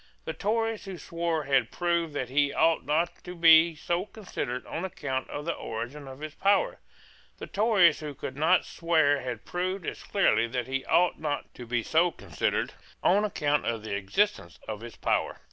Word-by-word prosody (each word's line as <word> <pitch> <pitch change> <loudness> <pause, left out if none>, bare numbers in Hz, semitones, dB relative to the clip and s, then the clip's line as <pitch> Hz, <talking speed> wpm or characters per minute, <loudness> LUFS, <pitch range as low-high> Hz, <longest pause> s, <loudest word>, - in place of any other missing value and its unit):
The 160 - -3
Tories 225 +4 -1
who 190 -2 -6
swore 165 -2 -2
had 135 -4 +2
proved 170 -2 -1
that 130 -3 -2
he 140 +1 +2
ought 165 -1 +2
not 165 +3 -1
to 180 0 -8
be 165 -1 +7
so 175 +5 -2
considered 180 - -5
on 165 - -4
account 135 -8 -3
of 150 - -5
the 170 - 0
origin 130 +6 -6
of 135 +2 -10
his 155 -1 -6
power: - - +2 0.6
the - - -6
Tories 200 -6 +4
who 150 -3 -7
would 130 - -5
not 160 +5 +3
swear 155 -4 +2
had 125 -3 -5
proved 185 +1 -2
as - - -5
clearly 180 - +2
that 125 0 -2
he 135 +1 -2
ought 180 0 +3
not 150 -2 -3
to 125 - -10
be 120 -1 0
so 165 +7 +3
considered 95 - -2 0.3
on 200 +3 +4
account 150 -8 0
of 115 -2 -2
the 110 - -4
existence 100 - 0
of 110 -1 -5
his 120 0 -9
power. - - 0
155 Hz, 185 wpm, -28 LUFS, 130-180 Hz, 0.6 s, be